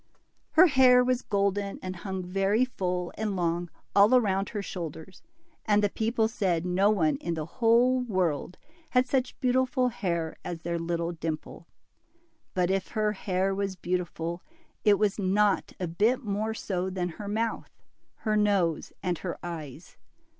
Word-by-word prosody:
Her 340 +3 +8
hair 255 -5 +6
was 250 0 +1
golden, 200 0 -1
and 185 0 -5
hung 190 +1 -4
very 195 +6 +1
full 180 -7 -3
and 215 -2 -1
long 175 -1 -1 0.3
all 210 +5 +7
round 195 -3 0
her 205 -3 -4
shoulders, 170 -1 -7 0.4
and 210 -1 +3
the 205 - +2
people 225 0 +1
said 185 -7 -1
no 185 +3 +3
one 165 -8 +2
in 170 -1 -3
the 155 -1 -3
whole 240 +6 +3
world 185 - -1 0.3
had 255 0 +3
such 255 0 -1
beautiful 255 0 +2
hair 170 -8 -2
as 170 -2 -5
their 170 0 -2
little 170 0 -2
Dimple. 160 -2 -5 0.9
But 180 0 +2
if 195 0 0
her 215 -1 +2
hair 195 -1 -1
was 195 -1 -2
beautiful, 175 -1 -3 0.4
it 210 -2 +5
was 210 0 +1
not 200 +1 +2
a 185 - -1
bit 215 +11 +1
more 215 +1 -2
so 185 -3 -2
than 180 -1 -2
her 200 +5 -8
mouth, 225 +2 -2 0.6
her 215 -1 +2
nose, 200 -6 +1
and 180 -3 -1
her 175 -3 -4
eyes. 160 -2 -8
195 Hz, 155 wpm, -28 LUFS, 175-220 Hz, 0.9 s, Her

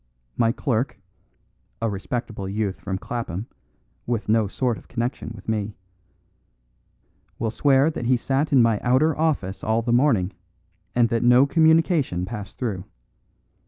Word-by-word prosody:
My 115 -1 +3
clerk 125 0 -1 0.8
(a 115 - 0
respectable 105 0 -4
youth 100 -1 -2
from 95 -1 -3
Clapham, 110 -2 -4 0.6
with 115 -3 -2
no 110 -1 +3
sort 120 +3 -1
of - - -20
connection 120 0 -3
with 100 - -13
me) 105 -1 -2 1.6
will 115 -1 -1
swear 140 +4 +3
that 120 -6 -4
he 125 0 +4
sat 135 +5 0
in 130 -4 +6
my 115 -3 +2
outer 135 +5 +2
office 145 - -1
all 110 +1 +1
the 120 0 0
morning, 115 -8 +3 0.6
and 120 -1 +4
that 115 0 0
no 125 +2 +6
communication 160 - +3
passed 105 -1 -7
through. 100 -7 -3
115 Hz, 140 wpm, -24 LUFS, 105-130 Hz, 1.6 s, in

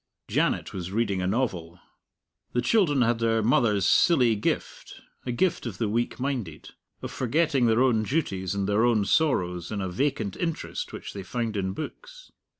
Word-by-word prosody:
Janet - - 0
was 90 -1 -5
reading 100 -3 0
a 90 - -1
novel. 90 -7 -2 0.7
The 120 - +1
children 150 - +3
had 115 0 +1
their 115 -1 +1
mother's 105 -4 +3
silly 125 - +4
gift 105 - -3 0.3
a - - 0
gift 160 +1 0
of 100 -6 -6
the 110 - 0
weak 120 +5 -1
minded, 125 - -4 0.3
of - - -5
forgetting 135 0 +1
their 115 +3 +4
own 120 -4 +3
duties 100 - -2
and 100 -1 -1
their 105 +2 +2
own 115 -4 +3
sorrows 90 - +1
in 105 - -2
a 95 - -2
vacant 110 0 -1
interest 165 -2 -4
which - - -8
they 100 - -6
found 115 +3 -3
in 95 -1 -1
books. - - -9
115 Hz, 170 wpm, -26 LUFS, 100-130 Hz, 0.7 s, silly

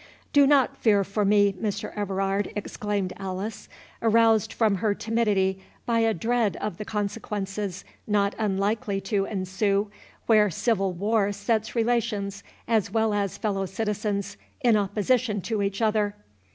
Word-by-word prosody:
"Do 285 -1 +6
not 275 -3 +3
fear 205 -3 +3
for 200 +2 -1
me, 205 0 +4
Mr. 205 +1 -4
Everard," 195 0 -1
exclaimed 205 -2 -3
Alice, 195 +3 -5 0.3
aroused 225 -1 +4
from 215 -4 +2
her 205 +1 0
timidity 205 -4 0 0.2
by 230 -1 +1
a 225 0 +3
dread 225 +2 0
of 210 -5 -4
the 210 - -4
consequences 205 -2 -3 0.2
not 205 -1 +2
unlikely 200 0 0
to 195 0 0
ensue, 200 +1 -1 0.3
where 215 -2 +5
civil 195 +1 0
war 205 +3 +1
sets 215 +3 -1
relations, 220 -4 0 0.3
as 220 -5 +2
well 220 +1 +1
as 200 -3 -1
fellow 195 -3 -1
citizens, 210 0 -2 0.2
in 240 -4 +4
opposition 210 +2 +1
to 220 +2 -2
each 200 +2 -1
other. 210 -1 +1
205 Hz, 140 wpm, -26 LUFS, 195-220 Hz, 0.3 s, Do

